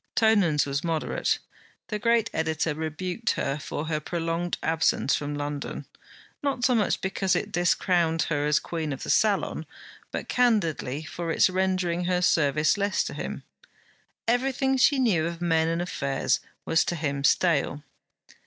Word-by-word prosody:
Tonans 200 -9 +3
was 140 +1 -2
moderate. 165 -2 0 0.5
The 210 -2 -2
great 230 0 +2
editor 160 -1 0
rebuked 175 +8 -2
her 140 +2 -2
for 145 +1 -4
her 155 -1 -1
prolonged 165 +2 -2
absence 160 -3 +1
from 145 0 -3
London, 145 0 -4 0.6
not 275 -3 0
so 255 - +4
much 215 -4 +1
because 190 -1 0
it - - -2
discrowned 170 -2 +2
her 145 -2 -1
as 150 0 +3
Queen 160 -4 -3
of 135 - -7
the - - -1
Salon, 210 -3 +1 0.5
but - - -4
candidly 165 - +1
for 170 +1 -5
its 185 - +3
rendering 185 -2 0
her 180 0 +1
service 155 +2 +3
less 200 0 +1
to - - -5
him. - - -5 0.8
Everything 265 +2 +1
she 270 +2 +4
knew 195 -11 +2
of 170 0 -5
men 165 -2 +2
and 165 +1 0
affairs 140 -6 0 0.3
was 160 - +3
to 175 - -1
him 140 -3 -2
stale. 145 -2 +2
170 Hz, 155 wpm, -26 LUFS, 155-195 Hz, 0.8 s, so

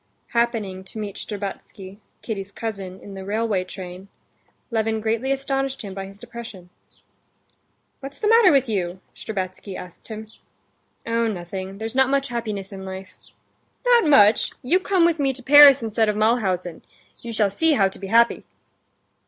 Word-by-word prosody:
Happening 225 -6 -1
to 190 - -11
meet 205 -2 -5
Shtcherbatsky, 200 -1 -7 0.2
Kitty's 200 -3 -5
cousin, 195 -5 -6
in 200 - -10
the 190 0 -7
railway 210 -1 -1
train, 185 0 -9 0.6
Levin 220 -1 0
greatly 225 +4 -1
astonished 270 -1 -2
him 200 -2 -7
by 195 0 -6
his 195 +1 -13
depression. 210 -8 -10 1.3
"What's 275 +1 -9
the 420 - 0
matter 455 -3 +6
with 270 -2 +3
you?" 185 -4 -2 0.2
Shtcherbatsky 190 -2 -5
asked 180 -1 -11
him. 220 -1 -7 0.8
"Oh, 230 0 0
nothing; 190 -1 -5
there's 220 +1 -5
not 265 0 +3
much 275 -1 +1
happiness 215 -5 -4
in 190 -1 -8
life." 190 0 -8 0.7
"Not 485 -4 +5
much? 215 -7 +5
You 340 +9 +3
come 375 -2 +2
with 335 -2 +1
me 270 -2 +1
to 255 0 -11
Paris 280 -1 +8
instead 220 0 +1
of 210 - 0
to - - -3
Mulhausen. 190 -7 0 0.4
You 235 - -6
shall 215 -3 +1
see 320 +10 +2
how 195 -8 +4
to 190 - -9
be 195 - -6
happy." 235 +3 +3
220 Hz, 160 wpm, -23 LUFS, 195-255 Hz, 1.3 s, Paris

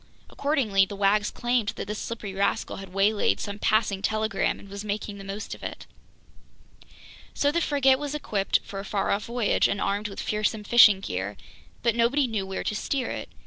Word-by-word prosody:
Accordingly, 260 -10 +2
the 200 - -7
wags 205 +1 +2
claimed 240 -3 0
that - - -5
this 210 +1 -4
slippery 220 -4 -5
rascal 195 +1 -1
had 195 -1 -8
waylaid 200 +2 +2
some 205 0 -5
passing 215 -3 +1
telegram 215 0 0
and - - -13
was 200 +1 -7
making 205 -1 -4
the - - -8
most 195 +2 -5
of - - -11
it. - - -6 1.5
So 285 - +2
the 340 +2 0
frigate 270 -3 +3
was 290 0 -4
equipped 205 -9 0
for 195 - -7
a - - -5
far 195 0 -1
off 200 +1 0
voyage 235 -3 +2
and 200 - -2
armed 205 +2 -1
with 195 - -8
fearsome 215 0 -1
fishing 210 -3 +7
gear, 95 - -4 0.5
but 235 -1 +3
nobody 245 +5 +3
knew 215 -5 -2
where 190 - -4
to - - -1
steer 260 +4 -2
it. - - -5
210 Hz, 190 wpm, -26 LUFS, 195-235 Hz, 1.5 s, fishing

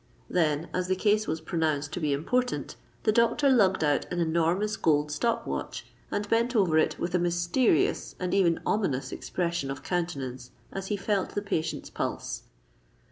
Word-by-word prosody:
Then, 155 -1 +1
as 180 0 -1
the 185 - +2
case 210 +2 +2
was 160 0 -2
pronounced 155 -3 -1
to - - -2
be 150 -3 0
important, 245 - -1 0.3
the 215 - +4
doctor 235 +5 +3
lugged 195 -9 +4
out 145 -1 +1
an 180 - -1
enormous 170 +6 +1
gold 150 -5 +2
stop 230 +10 0
watch, - - -4 0.2
and 205 0 -2
bent 235 +3 +1
over 175 -7 +4
it - - +1
with 175 +1 -3
a 180 - +3
mysterious 175 - +1
and 180 -1 -2
even 175 -4 +3
ominous 155 -11 0
expression 170 -5 -2
of 135 - -5
countenance 135 -8 -3 0.2
as 195 0 -5
he 205 - -1
felt 200 -1 -1
the 205 - 0
patient's 165 -5 -2
pulse. - - -3
175 Hz, 170 wpm, -28 LUFS, 155-205 Hz, 0.3 s, the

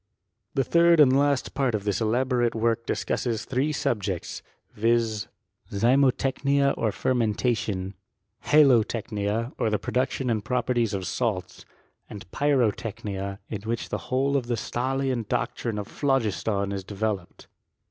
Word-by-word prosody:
The 135 - +3
third 170 +3 +4
and 135 -3 +6
last 140 -1 +1
part 130 -5 +1
of 100 - -3
this 100 +1 -1
elaborate 120 +1 +1
work 115 0 0
dis. - - -1
cusses 115 -2 -2
threesubjects; 120 - -1 0.3
viz. 115 -1 +1 0.4
zymotechniaozfei 135 +1 +2
mentation, 105 -4 -1 0.5
hiilotecknia, 115 -4 +2
or - - +1
the 105 - +1
production 125 +5 -1
and 110 -2 -1
properties 120 -3 0
of 95 -1 -3
salts, 100 -7 -2
z. - - -15 0.5
a6, 100 - -9
pyrotechnia, 105 -7 -1
in 105 -3 -5
which 115 +2 -3
the - - -2
whole 135 +2 +1
of 130 -4 0
the 120 - 0
Stahlian 130 0 -2
doctrine 115 -1 -2
of 105 0 -4
jiA/cpiis/on 110 -7 0
is 95 -1 -4
developed. 100 -2 -4
115 Hz, 125 wpm, -26 LUFS, 105-130 Hz, 0.5 s, and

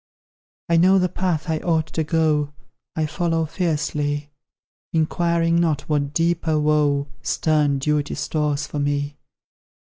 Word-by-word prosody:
I 170 - +3
know 185 +3 +5
the 180 -1 +3
path 180 -2 -1
I 160 -1 0
ought 160 -2 +1
to 160 - 0
go 150 -2 +1 0.4
I 160 - 0
follow 165 0 0
fearlessly, 150 -3 -2 0.6
Inquiring 170 +1 +2
not 155 -4 +1
what 145 -2 -1
deeper 165 -1 +1
woe 150 -2 +2 0.2
Stern 150 -1 +1
duty 150 +1 0
stores 150 -2 -1
for 150 - -5
me. 145 0 -1
155 Hz, 125 wpm, -22 LUFS, 145-165 Hz, 0.6 s, know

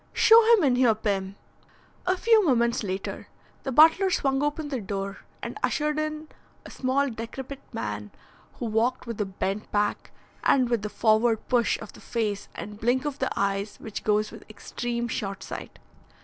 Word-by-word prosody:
Show 450 +1 +7
him 400 - +1
in 255 -4 +3
here, 245 -4 +4
Pim." 200 -3 -2 0.7
A 370 +1 +2
few 450 +1 +5
moments 235 -7 +2
later 190 -2 -4 0.3
the 270 - -4
butler 320 +8 +6
swung 270 -6 +1
open 295 +1 -1
the 265 -5 -3
door 195 0 -4 0.2
and - - -5
ushered 300 0 0
in 310 0 -3 0.4
a - - -10
small 260 +1 0
and 275 -5 -1
decrepit 260 +4 -6
man, 105 -1 -4 0.4
who - - -6
walked 225 +3 0
with 230 -3 -4
a - - +1
bent 195 +2 -3
back 205 0 0 0.3
and 255 -3 +3
with 235 -3 +1
the 210 - -4
forward 220 +2 +2
push 240 -3 +2
of 220 - -10
the - - -14
face 215 -4 -2
and 210 0 -7
blink 245 +5 +1
of 285 -1 -3
the - - 0
eyes 200 +1 -1
which 220 - -6
goes 210 0 +1
with - - -11
extreme 235 +2 -4
short 200 -4 -4
sight. - - -8
235 Hz, 175 wpm, -26 LUFS, 210-275 Hz, 0.7 s, Show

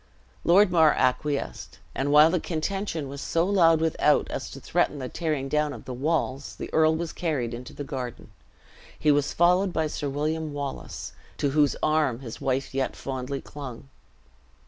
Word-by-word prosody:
Lord 185 +3 +5
Mar 160 -3 +5
acquiesced; 140 +2 -1 0.2
and 140 +2 -1
while 150 +2 +7
the 180 - +1
contention 165 -1 -3
was 140 +1 -7
so 165 +1 +1
loud 170 -5 +4
without, 160 -2 +2
as - - -4
to - - -9
threaten 150 - 0
the 130 -2 -4
tearing 150 -3 -2
down 150 +1 0
of - - -10
the 130 - -5
walls, 140 0 -1
the - - -7
earl 160 0 +4
was 165 -1 -4
carried 140 -9 -2
into 120 +1 -7
the 145 - -6
garden. 130 -4 -6 0.7
He 150 - +3
was 145 0 +2
followed 180 +3 +3
by 160 -2 0
Sir 150 -1 -3
William 155 +2 -2
Wallace, 140 -2 -5 0.2
to 140 - 0
whose 145 0 +3
arm 155 -5 +2
his 115 -4 -8
wife 135 +1 -1
yet 135 0 -1
fondly 135 +1 -4
clung. 135 -2 -9
150 Hz, 170 wpm, -26 LUFS, 135-160 Hz, 0.7 s, while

